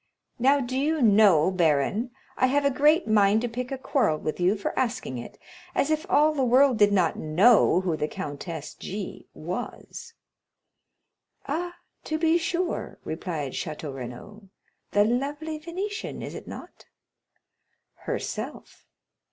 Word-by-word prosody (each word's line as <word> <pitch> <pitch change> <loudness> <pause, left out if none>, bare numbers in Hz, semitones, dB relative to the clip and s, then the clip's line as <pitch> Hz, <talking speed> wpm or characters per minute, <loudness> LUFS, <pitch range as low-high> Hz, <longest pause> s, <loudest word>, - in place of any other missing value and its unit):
Now, 275 +4 +4
do 255 -1 -3
you 305 +4 +1
know, 200 -6 +5
baron, 175 - +1 0.3
I 255 - +3
have 280 +2 +1
a 280 - +4
great 300 +4 +3
mind 210 0 +4
to 245 - -1
pick 250 +2 -5
a 270 - -2
quarrel 245 - +1
with 155 +2 -4
you 180 +3 +3
for 200 - -3
asking 225 - -2
it; 120 - -10 0.4
as 290 - +1
if 310 +4 -1
all 305 -1 +4
the 275 -3 0
world 255 0 +4
did 205 -1 +5
not 185 -5 +2
know 180 +4 +4
who 180 -4 -1
the 150 - -2
Countess 150 +2 -6
G—— 200 0 -7
was." 235 - -7 1.3
"Ah, 350 +5 -3 0.3
to 310 - -1
be 325 +1 +3
sure," 345 +2 -2
replied 160 -4 -4
Château 155 -3 -5
Renaud; 135 - -9 0.4
"the 205 0 +3
lovely 290 +6 -2
Venetian, 385 +7 -5
is - - -6
it - - -9
not?" - - -10 1.1
"Herself." - - -6
230 Hz, 145 wpm, -26 LUFS, 175-290 Hz, 1.3 s, know